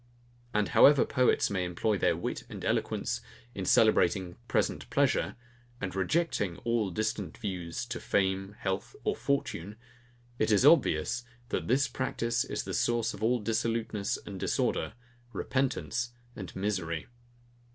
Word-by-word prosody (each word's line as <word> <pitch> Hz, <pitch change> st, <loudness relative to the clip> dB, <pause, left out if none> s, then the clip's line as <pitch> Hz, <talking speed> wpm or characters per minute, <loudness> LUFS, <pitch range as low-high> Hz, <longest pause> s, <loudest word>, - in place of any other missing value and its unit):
And 105 Hz, -1 st, +1 dB
however 145 Hz, -2 st, +7 dB
poets 125 Hz, -5 st, +2 dB
may 95 Hz, -2 st, 0 dB
employ 90 Hz, +5 st, 0 dB
their 95 Hz, -, +2 dB
wit -, -, -3 dB
and -, -, -7 dB
eloquence, -, -, 0 dB, 0.3 s
in 95 Hz, -, -4 dB
celebrating 90 Hz, -4 st, +3 dB
present -, -, 0 dB
pleasure, -, -, +2 dB, 0.4 s
and 95 Hz, -1 st, -4 dB
rejecting 95 Hz, -, 0 dB
all 115 Hz, -4 st, +1 dB
distant 110 Hz, +4 st, -2 dB
views 95 Hz, 0 st, -4 dB
to 115 Hz, -1 st, -5 dB
fame, 95 Hz, 0 st, 0 dB
health, 95 Hz, 0 st, -3 dB
or -, -, +1 dB
fortune; 105 Hz, -8 st, -2 dB, 0.6 s
it 110 Hz, -, +2 dB
is 105 Hz, +5 st, +4 dB
obvious, 120 Hz, -, +4 dB, 0.3 s
that -, -, -2 dB
this 135 Hz, +4 st, +3 dB
practice 120 Hz, -2 st, -1 dB
is -, -, -3 dB
the -, -, -5 dB
source 115 Hz, -1 st, +1 dB
of 100 Hz, -, -10 dB
all 120 Hz, +3 st, +2 dB
dissoluteness 115 Hz, -1 st, -1 dB
and 95 Hz, -2 st, -7 dB
disorder, -, -, 0 dB, 0.4 s
repentance 125 Hz, 0 st, -1 dB, 0.2 s
and 95 Hz, -8 st, -8 dB
misery. 95 Hz, -5 st, -2 dB
110 Hz, 135 wpm, -30 LUFS, 95-120 Hz, 0.6 s, however